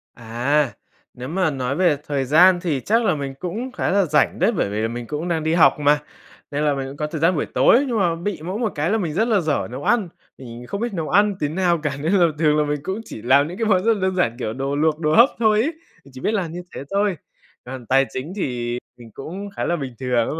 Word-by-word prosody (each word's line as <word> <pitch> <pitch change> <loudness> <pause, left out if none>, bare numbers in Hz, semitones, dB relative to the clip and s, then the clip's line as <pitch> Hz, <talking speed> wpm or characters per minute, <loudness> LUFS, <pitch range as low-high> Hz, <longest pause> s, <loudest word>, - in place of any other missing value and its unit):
À, 120 +5 0 0.4
nếu 125 +1 -8
mà 180 +3 0
nói 130 -1 -2
về 170 -3 +2
thời 140 -2 -1
gian 175 +7 +5
thì 150 -7 -1
chắc 230 +3 +2
là - - +2
mình 140 -2 -4
cũng 220 +9 -4
khá - - -2
là 200 0 +3
rảnh 150 -3 +1
đấy, - - +3
bởi 200 - -1
vì 105 +2 -2
là 110 - 0
mình 120 0 -6
cũng 150 +6 -4
đang 165 -3 -1
đi 160 - 0
học 165 -2 +4
mà, 145 0 +3 0.5
nên 145 +1 -1
là 150 -1 +2
mình 135 -1 -4
cũng 140 - -9
có 150 - -2
thời 150 0 -6
gian 170 +3 +3
buổi 150 - -1
tối. 265 +4 +4
Nhưng 235 - -1
mà 175 -4 +1
bị 170 -1 -4
mỗi 185 +6 -4
một 225 -4 -1
cái 150 +3 0
là 220 - +2
mình 170 -8 -2
rất 220 +8 +1
là 220 -4 +3
dở 155 -5 -1
nấu 130 +3 -6
ăn, 220 -3 +1 0.3
mình 120 -1 -10
không 200 +2 -4
biết 235 -3 -2
nấu 165 -4 -3
ăn 205 0 +3
tí 150 - 0
nào 175 +2 +1
cả 140 -3 -2
nên 160 +6 0
là 180 -4 +5
thường 150 -2 +3
là 150 - +3
mình 145 0 -2
cũng 190 +6 -3
chỉ - - -9
làm 140 +5 +4
những 175 +3 -8
cái 225 - -1
món 190 -3 +3
rất 230 +1 +4
là 210 - -4
đơn 190 0 0
giản, 150 -11 +1
kiểu, 110 - -3
đồ 135 +3 -3
luộc, 155 +1 +1
đồ 155 -2 +1
hấp 240 +4 +7
thôi 215 -2 +3
ấy, 310 +8 -1 0.3
mình 140 - -16
chỉ 130 - -10
biết 215 - 0
làm 185 -7 -1
như 175 +2 -6
thế - - -5
thôi. 200 -2 +1 0.5
Còn 125 -1 -8
tài 135 +3 +3
chính 140 +8 -6
thì 120 -9 -3 0.2
mình 115 -2 -14
cũng 190 +8 -7
khá - - -3
là 175 - 0
bình 135 -6 -5
thường 125 -3 +1
nhưng 160 - -4
155 Hz, 280 wpm, -21 LUFS, 135-190 Hz, 0.5 s, hấp